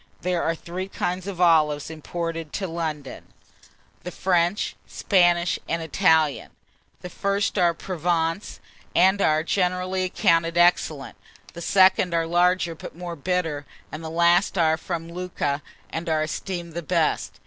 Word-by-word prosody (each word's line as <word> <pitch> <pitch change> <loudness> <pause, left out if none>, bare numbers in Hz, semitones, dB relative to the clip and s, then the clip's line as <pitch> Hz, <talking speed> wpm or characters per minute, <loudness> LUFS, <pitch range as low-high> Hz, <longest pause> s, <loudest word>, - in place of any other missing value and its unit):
There 180 -1 0
are 165 - 0
three 180 +3 -6
kinds 180 -1 -3
of 190 -3 -6
olives 155 -4 +3
imported 165 0 -5
to 195 - -2
London, 160 -5 -5 0.7
the - - -6
French, 180 +1 0
Spanish, 175 -3 +2
and 165 0 -1
Italian: 160 -4 +2 0.5
the 180 - -7
first 200 +1 -1
are 170 -2 +3
from 180 -1 -7
Provence, 165 +2 -1 0.4
and 190 +3 +4
are 155 -2 +3
generally 185 +1 0
accounted 165 -2 +1
excellent; 165 -5 +2 0.4
the 170 - -8
second 185 -1 +4
are 165 0 +1
larger, 175 +1 +2
but 165 +1 -10
more 175 -1 -6
bitter; 165 -2 -2 0.3
and 155 +1 -7
the 160 - -5
last 170 +4 +3
are 160 -2 +3
from 165 0 -5
Lucca, 170 -5 -3 0.3
and 165 +1 -4
are 155 -1 +1
esteemed 170 +1 -5
the 170 - -4
best. 160 - -1
170 Hz, 145 wpm, -24 LUFS, 160-180 Hz, 0.7 s, and